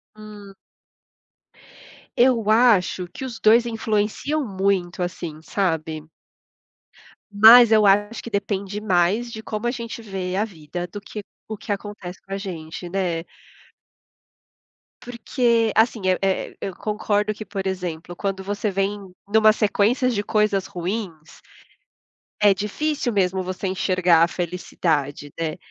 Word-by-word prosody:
Hum. 210 -2 -12 1.6
Eu 240 -4 +3
acho 215 -6 +3
que 175 - -9
os 240 -4 -6
2 230 +2 +5
influenciam 225 +6 -1
muito 190 -3 -1
assim, 170 -3 -6
sabe? 160 -4 -2 1.2
Mas 225 +3 +8
eu 215 -1 +5
acho 205 +3 +2
que - - -7
depende 200 0 -3
mais 205 +5 +1
de 220 0 -8
como 215 +2 -3
a - - +1
gente 235 -1 -6
vê 190 -4 -4
a 205 - +1
vida 175 -3 -6
do 205 +4 -8
que 210 +1 -8 0.3
o 220 - -5
que 210 - -7
acontece 200 -3 -6
com 195 - -8
a 195 - -1
gente, 175 -3 -7
né? 175 -3 -1 1.8
Porque, 235 -1 0
assim, 225 0 +3
é 185 - +2 0.3
é - - -21
eu 190 - -5
concordo 210 0 -1
que, 215 +1 -9
por 195 -2 -5
exemplo, 175 -2 -4
quando 195 0 -3
você 205 +2 -2
vem 195 +1 -1 0.3
numa 215 +1 +5
sequência 220 +4 +2
de 220 -5 0
coisas 210 -3 +1
ruins, 180 -3 -6 1.0
é 205 -1 +6
difícil 245 +6 -2
mesmo, 190 -1 +1
você 185 +1 -4
enxergar 185 -3 +3
a 170 - +4
felicidade, 160 -5 -2
né. 160 -2 -2
200 Hz, 135 wpm, -22 LUFS, 180-220 Hz, 1.8 s, Mas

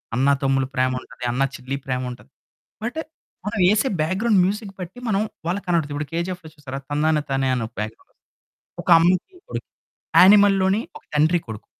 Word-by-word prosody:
అన్న-తమ్ముల, 135 0 +2
ప్రేమ 130 0 +2
ఉంటది 125 - -9
అన్న-చెల్లి, 135 +1 -2
ప్రేమ 130 -1 -1
ఉంటది. 120 - -12 0.5
బట్టు 300 +8 -2 0.4
మనం 205 -1 -2
ఎసే 215 +5 +2
బ్యాక్‌గ్రౌండ్ 190 +5 +2
మ్యూజిక్ 200 +1 -2
బట్టి 180 +7 -7
మనం 200 -1 +2 0.3
వాళ్ళకి 195 +3 -2
కనపడుద్ది. 160 -4 +1
ఇప్పుడు 145 0 -3
'కేజీఎఫ్‌లో' 170 -1 -4
చూసారా 135 -2 -7
'తందన 150 +1 +2
తానే' 135 -1 +1
అని 115 -2 -2
ఒక - - -21
బ్యాక్‌గ్రౌండ్స్ 110 +1 -7 0.7
ఒక - - -6
అమ్మకి 185 - +1
కొడుక్కి. - - -6 0.5
'యానిమల్‌లోని' 195 +1 +6 0.2
ఒక - - -28
తండ్రి-కొడుకు. 150 -9 0
160 Hz, 150 wpm, -22 LUFS, 135-195 Hz, 0.7 s, యానిమల్‌లోని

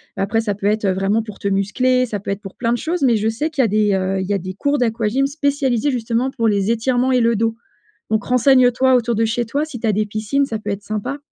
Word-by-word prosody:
Mais 195 - -1
après 225 +3 0
ça 210 -3 -2
peut 200 - -7
être, 210 0 +1
heu, 190 - +3
vraiment 195 +4 0
pour 215 -2 -10
te 200 - -4
muscler 250 +6 +1
ça 205 -2 -4
peut 200 - -5
être 195 +1 -4
pour 195 -2 -10
plein 235 0 0
de - - 0
choses 335 +3 -2
mais 245 -3 +4
je 215 +1 -1
sais 295 +9 -2
qu'il 285 -3 0
y - - +3
a - - +2
des, 210 0 +2
heu, 190 0 0
il - - -3
y 205 - 0
a 200 - 0
des 185 +1 -6
cours 285 +7 0
d'aquagym 230 +2 0
spécialisés 280 -2 0
justement 240 +1 -1
pour 230 -4 0
les 200 +1 +1
étirements 250 +2 +1
et 250 - +3
le 230 0 +2
dos. 225 +1 0 0.6
Donc 220 -1 0
renseigne-toi 255 0 +4
autour 235 -1 0
de 225 +1 +1
chez 235 +1 -1
toi, 285 +6 -1
si 280 -7 -8
tu 225 - -2
as 215 - +3
des 215 +2 +1
piscines, 215 +7 -1
ça 225 -4 -4
peut 210 -1 -5
être 200 0 -4
sympa. 215 +7 -4
225 Hz, 285 wpm, -19 LUFS, 205-255 Hz, 0.6 s, mais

